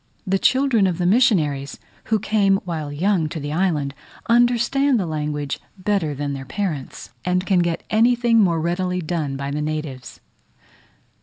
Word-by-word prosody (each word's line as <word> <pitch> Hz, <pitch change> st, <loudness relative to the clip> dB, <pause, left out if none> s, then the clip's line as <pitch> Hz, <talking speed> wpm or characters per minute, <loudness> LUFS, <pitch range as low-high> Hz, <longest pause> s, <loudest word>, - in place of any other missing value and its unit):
The 195 Hz, 0 st, +1 dB
children 260 Hz, -6 st, +3 dB
of 175 Hz, -3 st, -1 dB
the 180 Hz, -, -1 dB
missionaries, 170 Hz, -, +2 dB, 0.3 s
who 220 Hz, -, +2 dB
came 205 Hz, -2 st, +2 dB
while 160 Hz, -4 st, -4 dB
young 170 Hz, +1 st, +1 dB
to 160 Hz, -, -5 dB
the 145 Hz, 0 st, -4 dB
island, 155 Hz, -6 st, 0 dB, 0.3 s
understand 240 Hz, +3 st, +3 dB
the 190 Hz, -, -1 dB
language 150 Hz, -3 st, -3 dB, 0.2 s
better 185 Hz, -6 st, -1 dB
than 145 Hz, 0 st, -3 dB
their 135 Hz, -1 st, -5 dB
parents, 155 Hz, -, -5 dB
and 180 Hz, +1 st, 0 dB
can 190 Hz, -3 st, +2 dB
get 170 Hz, -1 st, -1 dB
anything 235 Hz, +1 st, +3 dB
more 170 Hz, -5 st, +2 dB
readily 180 Hz, +2 st, -1 dB
done 155 Hz, -4 st, -3 dB
by 140 Hz, 0 st, -4 dB
the 150 Hz, +1 st, -2 dB
natives. 150 Hz, -5 st, -5 dB
175 Hz, 155 wpm, -21 LUFS, 150-210 Hz, 0.3 s, children